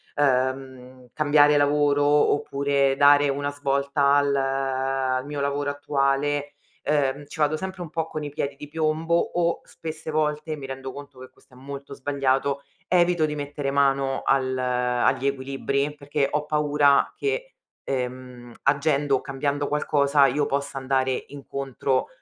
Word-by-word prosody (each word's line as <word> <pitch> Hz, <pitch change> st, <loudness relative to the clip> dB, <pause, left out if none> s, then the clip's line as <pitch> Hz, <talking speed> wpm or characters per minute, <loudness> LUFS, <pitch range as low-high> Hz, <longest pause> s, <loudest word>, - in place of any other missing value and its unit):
ehm, 130 Hz, -2 st, -1 dB
cambiare 150 Hz, -1 st, +4 dB
lavoro 145 Hz, 0 st, +3 dB
oppure 140 Hz, -1 st, +2 dB
dare 145 Hz, 0 st, +6 dB
una 145 Hz, +1 st, -1 dB
svolta 140 Hz, 0 st, +1 dB
al 145 Hz, -1 st, +2 dB
al 135 Hz, -1 st, -1 dB
mio 145 Hz, 0 st, -5 dB
lavoro 140 Hz, 0 st, -1 dB
attuale, 145 Hz, 0 st, -1 dB, 0.3 s
uhm, 145 Hz, -1 st, 0 dB
ci -, -, -11 dB
vado 150 Hz, 0 st, +2 dB
sempre 185 Hz, +1 st, -6 dB
un 165 Hz, -, -9 dB
po' 165 Hz, +1 st, -2 dB
con 155 Hz, -1 st, -5 dB
i 145 Hz, -, -4 dB
piedi 140 Hz, 0 st, -3 dB
di 150 Hz, -, -9 dB
piombo 160 Hz, +2 st, 0 dB
o 170 Hz, 0 st, 0 dB
spesse 160 Hz, -1 st, -7 dB
volte, 155 Hz, 0 st, -1 dB
mi 140 Hz, -, -8 dB
rendo 135 Hz, 0 st, -6 dB
conto 140 Hz, -1 st, -11 dB
che 130 Hz, -, -11 dB
questo -, -, -26 dB
è -, -, -16 dB
molto 140 Hz, +1 st, -8 dB
sbagliato, 140 Hz, 0 st, 0 dB, 0.2 s
evito 175 Hz, -2 st, +3 dB
di 150 Hz, -1 st, -3 dB
mettere 145 Hz, -1 st, -3 dB
mano 135 Hz, -1 st, +1 dB
al 130 Hz, -1 st, +1 dB
agli 125 Hz, +1 st, +1 dB
equilibri 140 Hz, +1 st, -2 dB
perché 145 Hz, -1 st, -1 dB
ho 150 Hz, 0 st, -1 dB
paura 145 Hz, -2 st, +3 dB
che, -, -, -3 dB, 0.3 s
ehm, 125 Hz, -2 st, -5 dB
agendo 140 Hz, 0 st, +2 dB
o -, -, -7 dB
cambiando 140 Hz, +1 st, -2 dB
qualcosa 145 Hz, -1 st, +3 dB
io 145 Hz, +3 st, 0 dB
possa 140 Hz, 0 st, -2 dB
andare 130 Hz, -1 st, 0 dB
incontro 135 Hz, -2 st, -2 dB
140 Hz, 145 wpm, -24 LUFS, 135-150 Hz, 0.3 s, dare